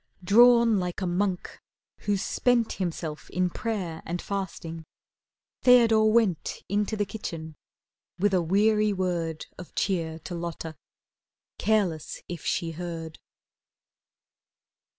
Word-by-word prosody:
Drawn 235 Hz, +2 st, +6 dB
like 180 Hz, -1 st, -3 dB
a -, -, 0 dB
monk 180 Hz, +1 st, -2 dB, 0.4 s
who's 205 Hz, -1 st, -1 dB
spent 245 Hz, -2 st, +2 dB
Himself 165 Hz, -4 st, -4 dB
in 180 Hz, 0 st, 0 dB
prayer 185 Hz, -8 st, -3 dB
and 175 Hz, +2 st, -3 dB
fasting, 170 Hz, -5 st, -5 dB, 0.8 s
Theodore 225 Hz, -3 st, +6 dB
went 215 Hz, -8 st, +1 dB
Into 210 Hz, +2 st, 0 dB
the 205 Hz, -, +1 dB
kitchen, 160 Hz, -7 st, -6 dB, 0.6 s
with 200 Hz, +2 st, +2 dB
a 185 Hz, -, +4 dB
weary 210 Hz, +4 st, +3 dB
word 170 Hz, -4 st, -2 dB
Of 180 Hz, -, -11 dB
cheer 165 Hz, -5 st, -1 dB
to 170 Hz, -, -8 dB
Lotta, 170 Hz, -2 st, -5 dB, 0.8 s
careless 195 Hz, -7 st, 0 dB
if 175 Hz, -3 st, -6 dB
she 165 Hz, -1 st, -1 dB
heard. 165 Hz, -1 st, -6 dB
185 Hz, 110 wpm, -27 LUFS, 165-210 Hz, 0.8 s, Drawn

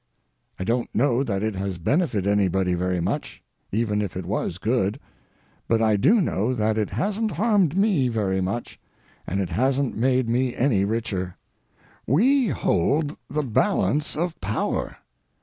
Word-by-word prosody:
I -, -, -4 dB
don't 120 Hz, +4 st, 0 dB
know 125 Hz, +2 st, +2 dB
that 100 Hz, -6 st, -2 dB
it 110 Hz, 0 st, -1 dB
has 95 Hz, -1 st, -3 dB
benefited 110 Hz, -, 0 dB
anybody 95 Hz, -2 st, +2 dB
very 90 Hz, +1 st, 0 dB
much, 85 Hz, -, -3 dB, 0.3 s
even 105 Hz, -1 st, 0 dB
if 100 Hz, -3 st, -4 dB
it 95 Hz, -, -5 dB
was 90 Hz, -2 st, -2 dB
good; 105 Hz, -1 st, 0 dB, 0.7 s
but 115 Hz, -, +2 dB
I 110 Hz, -1 st, +3 dB
do 200 Hz, -, +4 dB
know 125 Hz, -, 0 dB
that 110 Hz, -1 st, +1 dB
it 110 Hz, -2 st, -1 dB
hasn't 210 Hz, +1 st, -1 dB
harmed 195 Hz, -3 st, +2 dB
me 195 Hz, -10 st, +3 dB
very 100 Hz, -5 st, 0 dB
much, 100 Hz, +6 st, -4 dB, 0.5 s
and 95 Hz, -, -1 dB
is 95 Hz, -3 st, -1 dB
hasn't 130 Hz, +5 st, 0 dB
made 130 Hz, +1 st, +2 dB
me 125 Hz, +2 st, 0 dB
any 115 Hz, -7 st, +2 dB
richer. 100 Hz, -5 st, -3 dB, 0.7 s
We 250 Hz, -, +3 dB
hold 145 Hz, -, +1 dB
the 150 Hz, +2 st, -1 dB
balance 150 Hz, -, +1 dB
of 170 Hz, +2 st, -3 dB
power. 105 Hz, +3 st, -2 dB
115 Hz, 150 wpm, -24 LUFS, 100-145 Hz, 0.7 s, do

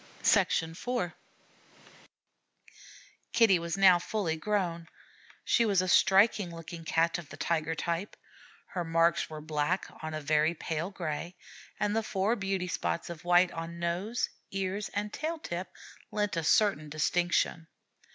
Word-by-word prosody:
IV 180 Hz, +2 st, +1 dB, 2.2 s
Kitty 225 Hz, -6 st, +5 dB
was 170 Hz, +1 st, -3 dB
now 185 Hz, -3 st, +7 dB
fully 180 Hz, -3 st, -2 dB
grown. 170 Hz, -2 st, -1 dB, 0.6 s
She 235 Hz, -, +3 dB
was 200 Hz, -4 st, +2 dB
a 185 Hz, -, +1 dB
striking 195 Hz, +1 st, +4 dB
looking 165 Hz, 0 st, -9 dB
Cat 165 Hz, +2 st, +1 dB
of 165 Hz, -, -11 dB
the -, -, -10 dB
tiger 165 Hz, -1 st, -1 dB
type. 170 Hz, +5 st, -3 dB, 0.5 s
Her 180 Hz, -, -3 dB
marks 165 Hz, 0 st, +2 dB
were 155 Hz, -1 st, -7 dB
black 155 Hz, +4 st, -1 dB, 0.2 s
on 155 Hz, 0 st, -4 dB
a -, -, -2 dB
very 155 Hz, +2 st, +2 dB
pale 160 Hz, +2 st, -3 dB
gray, 170 Hz, -2 st, -4 dB, 0.4 s
and 210 Hz, +1 st, 0 dB
the 225 Hz, -, +2 dB
four 215 Hz, +1 st, 0 dB
beauty 195 Hz, -3 st, -2 dB
spots 170 Hz, -1 st, -2 dB
of 165 Hz, -2 st, -9 dB
white 175 Hz, +1 st, +4 dB
on 165 Hz, +1 st, -6 dB
nose, 175 Hz, +7 st, -1 dB, 0.2 s
ears, 195 Hz, +2 st, -3 dB
and 210 Hz, +1 st, -2 dB
tail 320 Hz, +2 st, -3 dB
tip 180 Hz, -, -5 dB, 0.4 s
lent 210 Hz, -2 st, -1 dB
a 165 Hz, -, -1 dB
certain 160 Hz, -3 st, +3 dB
distinction. 165 Hz, +1 st, 0 dB
175 Hz, 140 wpm, -30 LUFS, 165-195 Hz, 2.2 s, now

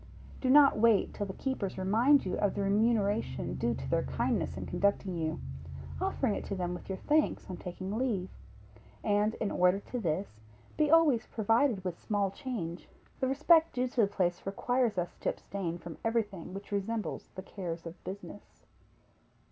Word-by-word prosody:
Do 260 Hz, -, 0 dB
not 280 Hz, -4 st, +7 dB
wait 225 Hz, -2 st, +4 dB
till 205 Hz, -, -3 dB
the 190 Hz, -, -5 dB
keepers 245 Hz, -7 st, -3 dB
remind 225 Hz, +9 st, +4 dB
you 185 Hz, -, -1 dB
of 205 Hz, -2 st, +1 dB
the 200 Hz, -, -1 dB
remuneration 210 Hz, +1 st, +1 dB
due -, -, 0 dB
to -, -, -6 dB
their -, -, +2 dB
kindness -, -, -1 dB
in -, -, -4 dB
conducting 200 Hz, -2 st, 0 dB
you; 160 Hz, -1 st, -2 dB, 0.6 s
offering 240 Hz, -6 st, +1 dB
it -, -, -3 dB
to 200 Hz, -, -3 dB
them 180 Hz, -1 st, -2 dB
with 180 Hz, -, -8 dB
your 190 Hz, -, -2 dB
thanks 300 Hz, +6 st, +1 dB
on 180 Hz, -, -5 dB
taking 185 Hz, +3 st, -5 dB
leave; 220 Hz, -7 st, 0 dB, 0.8 s
and 210 Hz, +1 st, +2 dB
in 205 Hz, -, -2 dB
order 180 Hz, +2 st, +3 dB
to 245 Hz, +4 st, -5 dB
this, 165 Hz, -, -2 dB, 0.4 s
be 305 Hz, -1 st, +2 dB
always 305 Hz, -7 st, +5 dB
provided 225 Hz, -1 st, +2 dB
with 180 Hz, -2 st, -3 dB
small 200 Hz, -2 st, 0 dB
change. 195 Hz, -, -5 dB, 0.3 s
The 260 Hz, -, +1 dB
respect 315 Hz, +4 st, +4 dB
due 250 Hz, 0 st, 0 dB
to 245 Hz, -, +1 dB
the 205 Hz, -, +4 dB
place 180 Hz, -3 st, 0 dB
requires 235 Hz, +2 st, 0 dB
us 175 Hz, -1 st, -2 dB
to -, -, 0 dB
abstain 175 Hz, -4 st, -4 dB
from 170 Hz, -2 st, -9 dB
everything 210 Hz, -6 st, -2 dB
which 200 Hz, +1 st, -8 dB
resembles 205 Hz, +2 st, -2 dB
the 190 Hz, -, -6 dB
cares 170 Hz, -4 st, -6 dB
of 165 Hz, +1 st, -9 dB
business. 200 Hz, +1 st, -9 dB
205 Hz, 175 wpm, -31 LUFS, 185-235 Hz, 0.8 s, not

